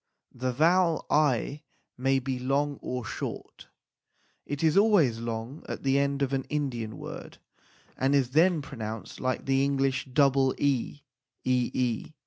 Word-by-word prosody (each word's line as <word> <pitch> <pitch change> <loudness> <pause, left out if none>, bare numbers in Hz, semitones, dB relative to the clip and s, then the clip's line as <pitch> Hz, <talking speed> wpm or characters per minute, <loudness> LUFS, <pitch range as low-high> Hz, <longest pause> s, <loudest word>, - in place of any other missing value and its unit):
The 130 +1 -2
vowel 165 +5 +3
i 145 -1 +2 0.3
may 135 +2 +2
be 130 -1 -2
long 140 +2 0
or 125 -2 -4
short. - - -6 0.8
It 145 +2 -3
is 160 0 +3
always 195 - +4
long 115 +5 -5
at - - -5
the 135 0 +3
end 140 0 0
of 140 0 -1
an 135 -1 -1
Indian 120 -7 -3
word, - - -8 0.6
and 135 +2 +2
is 130 -3 +2
then 160 +1 +3
pronounced 110 -5 -7
like 130 0 -2
the 135 0 +2
English 135 -1 0
double 135 0 +3
e 140 0 -1 0.4
ee 125 +1 0
135 Hz, 140 wpm, -28 LUFS, 125-145 Hz, 0.8 s, always